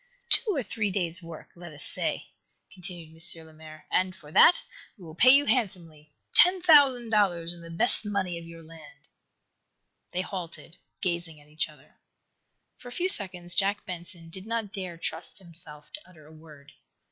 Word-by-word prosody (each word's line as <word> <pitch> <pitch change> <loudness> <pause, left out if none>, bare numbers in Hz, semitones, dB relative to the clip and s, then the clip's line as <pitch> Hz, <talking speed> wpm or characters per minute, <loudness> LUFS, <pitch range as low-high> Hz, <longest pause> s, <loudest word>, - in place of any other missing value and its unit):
"Two 420 -5 +5
or 275 - -2
three 210 0 -3
days' 175 -3 0
work, 165 -2 -12
let 175 -1 -12
us 150 - +6
say," - - +2 0.4
continued 170 -3 -8 0.2
M. 160 - -14
Lemaire. 155 0 -15
"And, 185 0 -1
for 150 -4 -16
that 340 - +5 0.3
we 190 - -16
will 160 - -11
pay 235 +10 +4
you 280 +2 +6
handsomely 170 - -2 0.2
ten 365 +1 +5
thousand 280 -9 +4
dollars 175 -6 +1
in 170 - -13
the 165 - -12
best 220 +10 +5
money 195 -5 -4
of - - -12
your 165 0 -13
land!" 155 -3 -17 1.0
They 180 - -3
halted, 180 -3 -9 0.2
gazing 170 -3 -4
at 145 0 -22
each 155 +1 -3
other. 150 -1 -21 0.8
For - - -15
a - - -10
few 360 +9 -1
seconds 180 - +3
Jack 200 +3 0
Benson 170 -2 -6
did 190 +4 -11
not 225 -3 -4
dare 185 -4 -7
trust 165 - -5
himself 165 -5 -10
to 300 - -11
utter 155 -4 -19
a 155 - -17
word. 150 -2 -17
175 Hz, 175 wpm, -26 LUFS, 160-205 Hz, 1.0 s, us